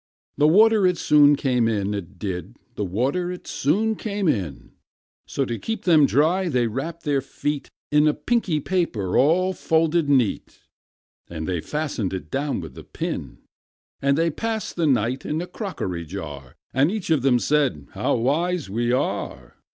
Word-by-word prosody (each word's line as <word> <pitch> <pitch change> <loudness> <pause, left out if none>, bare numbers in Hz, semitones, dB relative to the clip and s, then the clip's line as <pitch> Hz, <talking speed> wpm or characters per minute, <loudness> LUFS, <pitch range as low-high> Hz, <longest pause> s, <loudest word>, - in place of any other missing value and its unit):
The 150 - +4
water 210 +3 +5
it 180 -1 +1
soon 145 -2 +5
came 125 -5 +1
in, 105 -2 -1
it 100 -1 -6
did; 95 +3 -5 0.2
The 105 - -3
water 130 - -1
it 180 - -8
soon 210 +11 0
came 205 -3 -2
in: 90 - -2 0.6
So, 135 - -1
to 120 -2 -4
keep 225 0 -4
them 155 -5 +5
dry, 175 +6 +2
they 125 -5 +1
wrapped 150 +9 -4
their 145 -3 +1
feet 145 +1 -4 0.2
In 150 +1 +4
a 150 - +2
pinky 225 -10 0
paper 135 - -1
all 180 +7 +3
folded 160 -2 +1
neat; 130 -7 +1 0.7
And 80 -2 -5
they 90 -3 -1
fastened 140 - -3
it 95 - -8
down 140 -6 -1
with 80 - -9
a - - -10
pin. - - -5 0.6
And 140 0 +2
they 165 0 +2
passed 225 +5 -3
the 170 -3 +1
night 125 -1 +1
in 150 - -2
a 175 - -3
crockery 155 - -5
jar; 75 -6 -8 0.2
And 135 +4 +3
each 200 -4 -3
of 155 -4 +3
them 130 -1 +4
said, 135 - 0
"How - - 0
wise 155 - 0
we 120 +3 0
are! 125 - -2
145 Hz, 170 wpm, -23 LUFS, 110-170 Hz, 0.7 s, water